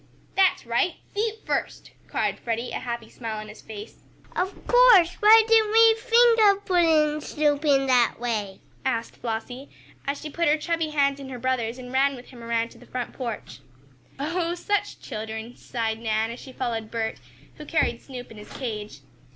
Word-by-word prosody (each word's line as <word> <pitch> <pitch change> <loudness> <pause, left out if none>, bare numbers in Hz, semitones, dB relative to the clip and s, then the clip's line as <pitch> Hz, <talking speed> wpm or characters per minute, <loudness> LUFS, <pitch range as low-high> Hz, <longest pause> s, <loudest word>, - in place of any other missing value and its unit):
"That's 380 -8 +3
right! 235 +9 +1 0.2
Feet 440 +1 -2
first!" - - -3 0.2
cried - - -1
Freddie, 235 +1 -3
a - - -3
happy 235 -2 -5
smile 225 -2 -6
on 215 0 -7
his 215 - -12
face. 215 0 -10 0.3
"Of 375 +2 -3
course! 480 -9 +6
Why 440 +1 +8
didn't 445 -2 +4
we 450 0 +7
think 465 0 +4
of 405 -1 +4
putting 315 -4 +3
Snoop 295 0 0
in 275 -3 +3
that 250 -3 +3
way?" 215 -5 -3 0.2
asked 230 -3 -2
Flossie, 245 +4 -5 0.4
as 280 0 -1
she 305 - -7
put 335 +1 0
her 300 +1 +4
chubby 330 0 -1
hand 280 -2 +1
in 270 -1 -8
her 255 - -6
brother's 245 -2 -1
and 250 0 -9
ran 275 +1 +3
with 245 -1 -12
him 240 -3 -12
around 230 0 -1
to - - -16
the - - -16
front 250 -2 -5
porch. 235 -5 -6 0.6
"Oh, 335 +4 -1
such 410 +3 -2
children!" 220 0 -6
sighed 225 -2 -3
Nan 220 0 0
as 235 - -8
she 265 - -11
followed 230 -4 -3
Bert, 225 - -3 0.4
who 300 - -9
carried 240 -7 0
Snoop 250 -2 -9
in 220 - -11
his 210 - -12
cage. 210 - -6
260 Hz, 185 wpm, -25 LUFS, 230-340 Hz, 0.6 s, Why